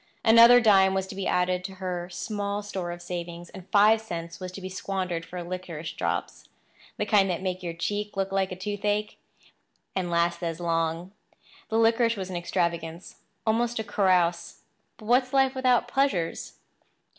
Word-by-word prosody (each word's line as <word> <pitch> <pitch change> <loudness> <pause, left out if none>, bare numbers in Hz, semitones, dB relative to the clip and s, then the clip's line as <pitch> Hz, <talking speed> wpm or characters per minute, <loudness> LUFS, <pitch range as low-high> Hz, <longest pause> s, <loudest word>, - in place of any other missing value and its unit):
Another 230 +2 +8
dime 195 -4 +5
was 190 -1 0
to 190 - -9
be 195 0 -3
added 180 0 +1
to 190 +1 -7
her 180 -2 -4
small 205 +3 -3
store 190 -4 -4
of 175 0 -7
savings; 175 -1 -6
and 185 -1 -12
five 215 +2 +5
cents 170 -5 -6
was 185 -1 -6
to 195 - -7
be 185 - -6
squandered 185 -2 -3
for 175 +1 -7
licorice 170 -3 -6
drops—the - - -5
kind 200 -3 +3
that 180 +1 -2
made 185 -1 -2
your 170 -2 -4
cheek 205 +4 -3
look 195 0 -1
like 195 -1 +1
the 185 - -5
toothache, 205 +2 -2 0.8
and 185 -2 -1
last 170 0 +1
as 165 -1 -3
long. 165 +1 -1 0.6
The 225 - 0
licorice 230 0 +3
was 190 -1 -5
an - - -5
extravagance—almost 175 +7 -2
a 220 - -1
carouse—but 180 0 -1
what 245 +4 +5
is 255 - -19
life 270 -1 +3
without 255 -2 +2
pleasures? 240 -11 -1
190 Hz, 165 wpm, -26 LUFS, 175-210 Hz, 0.8 s, Another